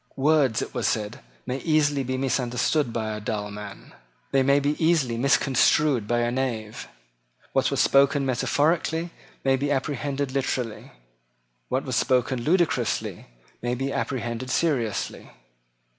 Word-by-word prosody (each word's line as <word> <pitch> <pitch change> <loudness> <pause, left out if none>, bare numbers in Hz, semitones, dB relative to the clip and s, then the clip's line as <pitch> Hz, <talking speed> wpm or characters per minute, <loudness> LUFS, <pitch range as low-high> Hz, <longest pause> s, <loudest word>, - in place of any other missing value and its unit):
Words, 140 -4 +2
it - - -8
was - - 0
said, 105 -1 -2 0.3
may 130 +2 -3
easily 145 -3 +2
be 130 +1 -2
misunderstood 130 +1 0
by 110 -1 -2
a - - -5
dull 105 0 -3
man. 100 -1 -9 0.4
They 135 - +3
may 140 +2 +4
be 145 +1 0
easily 155 -8 +2
misconstrued 135 -1 +3
by 120 +1 +1
a 120 0 0
knave. 120 -4 -3 0.7
What - - +2
was - - +1
spoken 140 0 +4
metaphorically 160 +6 0 0.3
may 135 0 +3
be 140 +2 -1
apprehended 140 0 -2
literally. 130 -4 -3 0.8
What - - 0
was - - -1
spoken 125 0 +1
ludicrously 170 +5 0 0.3
may 120 +1 -1
be 135 +2 -3
apprehended 120 -1 -3
seriously. 130 -9 -1
130 Hz, 135 wpm, -25 LUFS, 120-145 Hz, 0.8 s, may